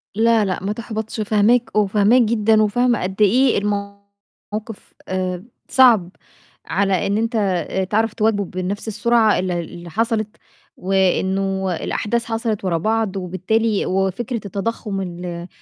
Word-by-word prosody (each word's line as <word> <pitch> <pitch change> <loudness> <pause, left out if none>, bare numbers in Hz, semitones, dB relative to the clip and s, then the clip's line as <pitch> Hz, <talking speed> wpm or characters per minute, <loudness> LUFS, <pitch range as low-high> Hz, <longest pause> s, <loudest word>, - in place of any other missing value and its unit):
لا، 225 0 +3
لأ 185 -1 -3
ما 200 +2 -1
تحبطش، 220 0 -5
فهماك، 215 +3 +2
وفاهماك 210 +3 +4
جدًا 220 -1 +3
وفاهمة 240 +2 +1
قد 190 +3 -4
إيه 245 +5 +4
الموقف 200 +1 -6
آآ 185 -1 -2 0.3
صعب، 235 -9 +5 0.6
على 195 -3 0
إن 200 +1 0
أنت 215 -6 0 0.2
تعرف 220 +1 +1
تواكبه 215 -2 +1
بنفْس 185 +4 -4
السرعة 220 +1 +2
اللي 180 -1 -1
اللي 170 +1 -8
حصلِت، 220 +2 -1 0.4
وإنه 190 0 0
الأحداث 235 +7 -2
حصلِت 225 -2 -2
ورا 175 -3 +1
بعض، 215 +2 -1
وبالتالي 195 +4 0
وفكرة 195 +5 -1
التضخُّم 200 0 -3
ال 175 -1 -6
205 Hz, 125 wpm, -20 LUFS, 190-225 Hz, 0.6 s, صعب